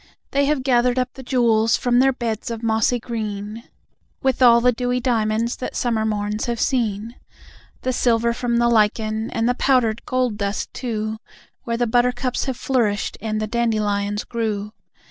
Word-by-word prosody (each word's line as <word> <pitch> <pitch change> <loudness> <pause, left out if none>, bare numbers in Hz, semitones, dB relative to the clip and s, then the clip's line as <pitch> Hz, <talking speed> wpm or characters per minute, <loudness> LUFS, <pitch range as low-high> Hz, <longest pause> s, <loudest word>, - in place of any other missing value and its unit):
They 280 0 +2
have 285 -2 0
gathered 250 -1 +2
up 255 0 -1
the 265 - -10
jewels 230 -4 +2
from 245 -1 +2
their 270 +1 +5
beds 235 -2 -3
of 230 0 -5
mossy 225 +2 +2
green, 215 -1 -5 0.6
With 265 -1 +1
all 235 -2 +7
the 250 +1 +4
dewy 245 +1 -1
diamonds 230 -2 0
that - - -5
summer 225 -3 0
morns 210 0 -2
have 235 -1 -2
seen; 230 -2 -1 0.7
The 255 - 0
silver 235 -1 +2
from 235 0 -1
the 235 0 +3
lichen 220 0 +1
and 230 0 -1
the 245 - +3
powdered 245 -4 +1
gold 255 -4 0
dust, 200 0 -3
too, 220 -3 -3 0.5
Where 230 -2 -1
the 240 - +1
buttercups 245 +2 +1
have 265 -3 -3
flourished 225 -6 0
and 215 -1 -2
the 215 - -1
dandelions 210 -3 0
grew. 215 -3 -3
235 Hz, 165 wpm, -21 LUFS, 215-250 Hz, 0.7 s, all